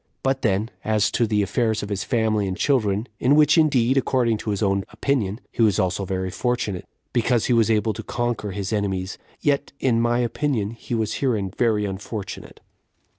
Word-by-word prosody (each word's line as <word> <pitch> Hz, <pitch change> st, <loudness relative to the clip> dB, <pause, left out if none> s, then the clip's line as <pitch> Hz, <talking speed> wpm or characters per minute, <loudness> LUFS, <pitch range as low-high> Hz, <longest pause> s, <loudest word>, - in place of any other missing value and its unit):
But 135 Hz, 0 st, +1 dB
then, 110 Hz, +1 st, 0 dB
as 110 Hz, -1 st, +2 dB
to 115 Hz, -, +1 dB
the 105 Hz, -1 st, +2 dB
affairs 110 Hz, 0 st, 0 dB
of 100 Hz, -, -5 dB
his 100 Hz, -2 st, -2 dB
family 110 Hz, -4 st, +1 dB
and 95 Hz, -1 st, -3 dB
children, 110 Hz, -5 st, +1 dB
in 135 Hz, +3 st, +4 dB
which 150 Hz, -1 st, +5 dB
indeed, 135 Hz, -5 st, +3 dB
according 120 Hz, -4 st, +2 dB
to -, -, -5 dB
his 105 Hz, +1 st, -1 dB
own 100 Hz, -1 st, +1 dB
opinion, 115 Hz, -7 st, -1 dB
he -, -, -2 dB
was 105 Hz, -5 st, +4 dB
also 95 Hz, +2 st, 0 dB
very 95 Hz, 0 st, -2 dB
fortunate, 105 Hz, -3 st, -2 dB, 0.3 s
because 120 Hz, -1 st, +2 dB
he 125 Hz, -, +2 dB
was 115 Hz, -1 st, +3 dB
able 110 Hz, 0 st, +2 dB
to 110 Hz, -, -6 dB
conquer 120 Hz, -1 st, -2 dB
his 100 Hz, +2 st, -3 dB
enemies, 95 Hz, -2 st, -2 dB, 0.2 s
yet, 145 Hz, -1 st, 0 dB
in 115 Hz, -3 st, +2 dB
my 120 Hz, 0 st, +2 dB
opinion, 120 Hz, -3 st, -1 dB
he 115 Hz, +1 st, -5 dB
was 110 Hz, -2 st, -1 dB
herein 110 Hz, -8 st, 0 dB
very 110 Hz, -4 st, +2 dB
unfortunate. 100 Hz, +1 st, -6 dB
110 Hz, 185 wpm, -23 LUFS, 100-120 Hz, 0.3 s, which